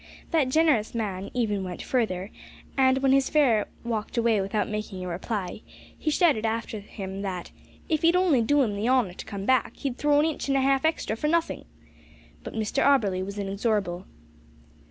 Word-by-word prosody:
That 305 -6 +2
generous 270 -7 +2
man 200 -4 -3
even 210 -5 0
went 180 -1 -6
further, 205 -6 -1 0.4
and, 260 -1 +4
when 270 - +4
his 270 0 +3
fare 255 -9 +3 0.2
walked 230 0 -3
away 230 -3 +3
without 200 +2 -1
making 210 -3 -5
a - - -4
reply, 185 +2 -4 0.3
he 310 - -2
shouted 300 -8 +3
after 225 -1 -2
him 195 -1 -7
that 185 -3 -5 0.4
"if 315 -2 0
he'd 335 +1 +4
only 355 -9 +4
do 285 +5 +3
'im 210 -4 -1
the 210 +4 -1
honour 250 -8 +2
to - - -9
come 200 -2 -5
back, 255 -1 +1
he'd 265 -4 -3
throw 295 0 +3
in 300 - +3
a - - +2
inch 295 - -5
an' 275 - +2
a 270 - +3
half 270 +1 +2
extra 320 -8 0
for 300 - -2
nothink." 335 +1 0 0.8
But - - -8
Mr 220 +5 0
Auberly 210 -10 +3
was 200 +2 -6
inexorable. 195 -2 -1
225 Hz, 190 wpm, -26 LUFS, 200-275 Hz, 0.8 s, and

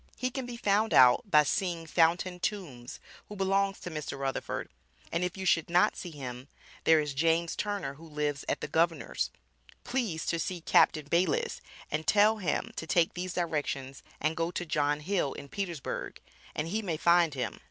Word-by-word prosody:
He 255 0 -1
can 260 -1 -4
be 240 -1 -6
found 210 0 +2
out 125 +9 +6
by 150 -4 +6
seeing 170 +2 -1
Fountain 175 +3 +2
Tombs 155 - -4 0.3
who 210 - -7
belongs 195 0 +1
to 175 - -6
Mr. 150 -3 -5
Rutherford 135 -1 -3 0.4
and 170 +2 0
if 180 +1 -2
you 190 - -4
should 165 -3 +2
not 175 +1 +4
see 180 - -6
him, 130 -4 -7 0.4
there 160 -1 +6
is 150 -2 -2
James 165 +3 +1
Turner 205 -8 -2
who 160 +4 -13
lives 150 -2 -2
at - - -1
the - - -3
Governors, 165 0 0 0.5
Please 225 -11 -2
to 170 - 0
see 175 0 -3
Captain 155 -2 +4
Bayliss 170 +2 +1 0.3
and 155 +1 -2
tell 210 +1 +5
him 180 -8 -1
to 160 - -4
take 165 0 +3
these 180 0 -4
directions 145 -6 -2 0.2
and 155 +2 0
go 165 +1 0
to 175 0 -4
John 150 -2 0
Hill, 175 -4 0
in 140 - -9
Petersburgh, 175 -6 -4 0.4
and 155 +2 -2
he 215 +5 -1
may 175 -7 -2
find 170 -2 +4
him. 125 -3 -3
165 Hz, 185 wpm, -30 LUFS, 150-190 Hz, 0.5 s, out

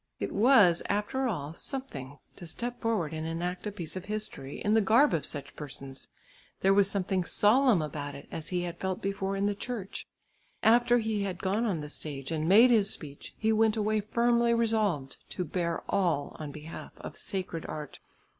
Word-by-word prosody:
It - - -3
was 205 -6 +6
after 210 +6 0
all 155 - -3
something 145 - -6 0.2
to 175 - -10
step 240 +8 -5
forward 210 -9 0
and 160 0 -3
enact 175 +4 -3
a - - -2
piece 175 -5 -6
of 185 -1 -5
history 210 -10 -5
in 210 - +1
the 225 - +5
garb 230 +8 +5
of 160 - 0
such 145 -1 -4
persons. 135 -2 -7 0.5
There 195 +1 +5
was 200 0 +4
something 190 -2 0
solemn 215 - +4
about 145 -1 -5
it 140 - -11
as 160 - -5
he 180 -1 -1
had 175 -1 -5
felt 190 -1 -2
before 195 0 -2
in 195 +1 0
the 205 - +2
church. 205 -2 -6 0.6
After 240 +2 +5
he 220 -3 -1
had 190 -3 -2
gone 200 +5 +1
on 185 -8 -1
the 150 - -6
stage 140 -2 -6
and 160 0 -1
made 230 +6 +8
his 210 -4 +4
speech 145 -6 -7
he 220 0 +2
went 220 0 +3
away 215 0 +1
firmly 235 +2 +2
resolved 215 -12 0 0.2
to 180 - -2
bear 170 +1 -2
all 170 -7 0
on 150 -2 -5
behalf 155 +2 -9
of - - -8
sacred 180 -4 -4
art. 150 -2 -7
195 Hz, 190 wpm, -29 LUFS, 160-220 Hz, 0.6 s, made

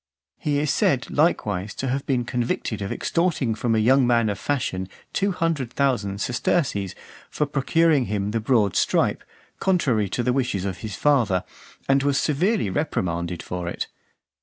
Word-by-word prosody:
He 145 -1 0
is 145 -1 +1
said - - +1
likewise 95 +3 +1
to 135 - -3
have 135 +2 -2
been 125 -3 +1
convicted 120 -3 -2
of 100 - -3
extorting 165 -9 0
from 115 +1 0
a - - +2
young 125 +4 +4
man 115 -2 +3
of 100 -1 -3
fashion 95 -10 -2 0.2
two 200 +1 +1
hundred 165 -9 -1
thousand 115 -8 0
sesterces 120 - 0 0.3
for 150 - 0
procuring 145 0 +2
him 105 -1 -2
the 115 - 0
broad 110 -4 +2
stripe, - - +1 0.4
contrary 130 - +1
to 120 - -1
the 125 +1 +1
wishes 125 -8 -1
of 95 -3 -3
his 105 0 -5
father, 120 -11 +2 0.4
and 135 0 +4
was 140 0 +1
severely 180 - +1
reprimanded 90 - -2
for 90 -1 -4
it. - - -4
125 Hz, 160 wpm, -24 LUFS, 100-145 Hz, 0.4 s, young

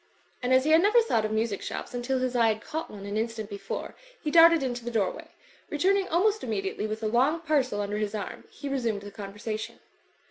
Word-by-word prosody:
And 250 0 -1
as 260 0 +5
he 310 - +1
had 320 +1 +7
never 425 +5 +5
thought 230 - +1
of 215 - -2
music 220 -2 -1
shops - - -5
until 245 +2 -1
his 255 -1 -1
eye 230 -2 +4
had 220 0 0
caught 320 +1 -4
one 200 -1 -9
an 205 +1 -3
instant 220 -1 -3
before, 200 - -5 0.3
he 300 - -3
darted 335 -2 +7
into 245 -2 -3
the 240 - -3
doorway. 215 -6 -1 0.4
Returning 380 +5 +2
almost 410 +5 +2
immediately 210 -2 -2
with 215 +1 -5
a - - +1
long 260 +9 +2
parcel 275 -10 +1
under 205 +1 -2
his 210 0 -2
arm» 205 - -6
he 285 - -8
resumed 235 -7 -1
the 205 - -8
conversa 210 +2 -5
tion. - - -7
235 Hz, 220 wpm, -27 LUFS, 215-300 Hz, 0.4 s, had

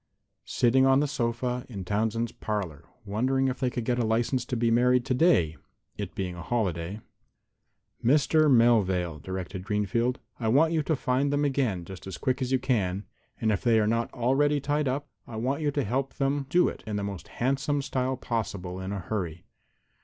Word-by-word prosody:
"Sitting 130 +2 +3
on 135 0 +5
the 150 - +2
sofa 125 -1 -1
in 100 -6 -6
Townsend's 110 +3 0
parlor, 105 -10 -4 0.2
wondering 130 +6 +1
if 125 - -4
they 130 -2 +1
could 120 -2 -4
get 125 0 +1
a - - +2
license 115 +3 +1
to 125 - -3
be 115 0 +2
married 125 +1 +3
today, 125 - +3 0.4
it - - -6
being 90 -2 -3
a 85 - -8
holiday." 95 -3 -2 1.0
"Mr. 150 +4 +4
Melvale," 95 - +3
directed 95 +2 -5
Mr. - - -13
Greenfield, 105 +5 0 0.2
"I 115 - -1
want 155 +8 +4
you 160 - +2
to 155 +1 0
find 135 +2 0
them 145 0 +1
again, 125 -11 0
just 95 +1 -9
as 95 - -6
quick 130 0 -1
as 130 0 -1
you 130 - +4
can, 100 -7 0 0.3
and 110 - +1
if 100 - 0
they 115 -2 +4
are 105 - +2
not 115 +2 0
already 140 +4 +2
tied 145 +1 0
up 135 +3 -2 0.2
I 115 - -8
want 130 +7 -1
you 150 - +1
to 145 -1 0
help 135 +5 -2
them 140 0 0
do 175 +3 +4
it - - -5
in 105 - -2
the 100 - -2
most 100 -2 -5
handsome 140 +3 0
style 130 -2 -1
possible 100 -7 -3
in 95 +1 -4
a 100 -2 -3
hurry. 90 -4 -4
120 Hz, 195 wpm, -27 LUFS, 100-135 Hz, 1.0 s, on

